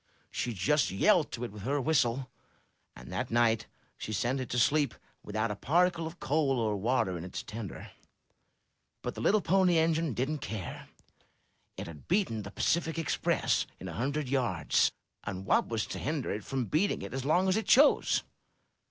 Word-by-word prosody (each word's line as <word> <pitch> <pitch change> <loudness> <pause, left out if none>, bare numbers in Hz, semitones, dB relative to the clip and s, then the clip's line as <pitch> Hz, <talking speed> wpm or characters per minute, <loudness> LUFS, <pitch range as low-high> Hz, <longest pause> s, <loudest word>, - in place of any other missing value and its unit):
She 120 - -2
just 120 - +2
yelled 155 - +3
to 120 - -4
it 120 - -4
with 105 0 -10
her 140 +7 0
whistle; 130 -3 +1 0.6
and 60 +1 -11
that - - -2
night 115 -1 +2 0.3
she - - -5
sent 120 +6 0
it 130 - -4
to 125 - -2
sleep 140 +2 +3 0.3
without 110 +2 -2
a - - -3
particle 170 - +2
of 170 +2 -10
coal 140 -3 +1
or 110 -2 0
water 100 -4 0
in - - -7
its 90 - -6
tender. 110 -3 -7 1.1
But - - -3
the - - -7
little 210 +1 +3
Pony 180 0 +3
Engine 160 -4 +1
didn't 145 +5 -1
care. 105 -9 -6 0.9
It - - -5
had 80 -3 -11
beaten 175 - +1
the 100 - -7
Pacific 165 - 0
Express 165 -3 +1
in - - -7
a - - -6
hundred 140 +5 -2
yards, 120 - +2 0.3
and 95 -2 -5
what - - +3
was 115 -2 -1
to - - -6
hinder 145 -2 -2
it 105 0 -3
from 135 -2 -2
beating 165 - 0
it - - -7
as 135 -1 -3
long 175 +7 +3
as 190 - +3
it 220 - -1
chose? 285 +3 +5
130 Hz, 180 wpm, -30 LUFS, 110-160 Hz, 1.1 s, chose